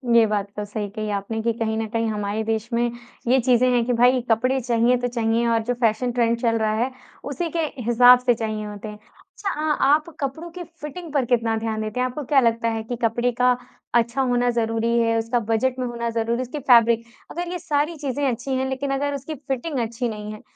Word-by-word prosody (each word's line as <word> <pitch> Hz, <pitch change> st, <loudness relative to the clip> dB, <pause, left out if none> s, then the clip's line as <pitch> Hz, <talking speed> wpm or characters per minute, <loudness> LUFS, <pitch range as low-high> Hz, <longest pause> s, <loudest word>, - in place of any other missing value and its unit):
ये 230 Hz, -1 st, +7 dB
बात 205 Hz, -1 st, -1 dB
तो 210 Hz, -, -2 dB
सही 205 Hz, 0 st, -4 dB
कही 215 Hz, -1 st, -3 dB
आपने 220 Hz, +3 st, -4 dB
कि 230 Hz, +1 st, +1 dB
कहीं 220 Hz, -1 st, -1 dB
न 225 Hz, -, -1 dB
कहीं 230 Hz, +1 st, -1 dB
हमारे 210 Hz, 0 st, -2 dB
देश 220 Hz, 0 st, -2 dB
में 240 Hz, 0 st, +1 dB, 0.4 s
ये 260 Hz, +2 st, +4 dB
चीज़ें 250 Hz, 0 st, +3 dB
हैं 240 Hz, -1 st, +3 dB
कि 245 Hz, -, 0 dB
भई 245 Hz, +2 st, +4 dB
कपड़े 255 Hz, +4 st, +2 dB
चाहिए 240 Hz, +1 st, +2 dB
तो 245 Hz, 0 st, -1 dB
चाहिए 235 Hz, -1 st, 0 dB
और 230 Hz, -1 st, +2 dB
जो -, -, +3 dB
फ़ैशन 240 Hz, 0 st, +1 dB
ट्रेंड 235 Hz, -1 st, +1 dB
चल 230 Hz, -2 st, +2 dB
रहा 215 Hz, -1 st, +1 dB
है, 260 Hz, -, -2 dB, 0.3 s
उसी 305 Hz, +5 st, -3 dB
के -, -, +1 dB, 0.2 s
हिसाब 245 Hz, +2 st, +7 dB
से 250 Hz, -1 st, +3 dB
चाहिए 215 Hz, -2 st, -3 dB
होते 210 Hz, 0 st, -7 dB
हैं। 210 Hz, -, -7 dB
अच्छा 390 Hz, -, -8 dB
अ, 305 Hz, -1 st, 0 dB
आप 300 Hz, +4 st, +3 dB
कपड़ों 295 Hz, +4 st, -4 dB
की 355 Hz, +1 st, -7 dB, 0.2 s
फ़िटिंग 315 Hz, +3 st, -7 dB
पर 275 Hz, -4 st, +2 dB
कितना 230 Hz, -2 st, +1 dB
ध्यान 220 Hz, -1 st, -2 dB
देते 215 Hz, +3 st, -4 dB
हैं? 255 Hz, -, +2 dB
आपको 255 Hz, +4 st, -5 dB
क्या 275 Hz, +1 st, +4 dB
लगता 230 Hz, -2 st, +2 dB
है 225 Hz, -1 st, -3 dB
कि 245 Hz, +2 st, -4 dB
कपड़े 240 Hz, +2 st, +1 dB
का 250 Hz, 0 st, +4 dB, 0.4 s
अच्छा 235 Hz, +3 st, +2 dB
होना 245 Hz, -1 st, +2 dB
ज़रूरी 230 Hz, 0 st, 0 dB
है, 230 Hz, 0 st, +2 dB
उसका 230 Hz, +2 st, 0 dB
बजट 230 Hz, +3 st, 0 dB
में 255 Hz, -, -1 dB
होना 235 Hz, -1 st, -3 dB
ज़रूरी 230 Hz, 0 st, -1 dB
है, -, -, -2 dB
उसकी 255 Hz, +4 st, -5 dB
फ़ैब्रिक 235 Hz, -3 st, +5 dB, 0.3 s
अगर 350 Hz, +1 st, -4 dB
ये 360 Hz, -, -3 dB
सारी 310 Hz, -1 st, 0 dB
चीज़ें 285 Hz, -1 st, -1 dB
अच्छी 245 Hz, +3 st, -5 dB
हैं 260 Hz, 0 st, -1 dB
लेकिन 270 Hz, +1 st, -2 dB
अगर 285 Hz, +1 st, -1 dB
उसकी 280 Hz, +3 st, -6 dB
फ़िटिंग 270 Hz, +1 st, -3 dB
अच्छी 235 Hz, +1 st, -2 dB
नहीं 210 Hz, -1 st, -6 dB
है, 215 Hz, -, -11 dB
240 Hz, 230 wpm, -23 LUFS, 225-260 Hz, 0.4 s, ये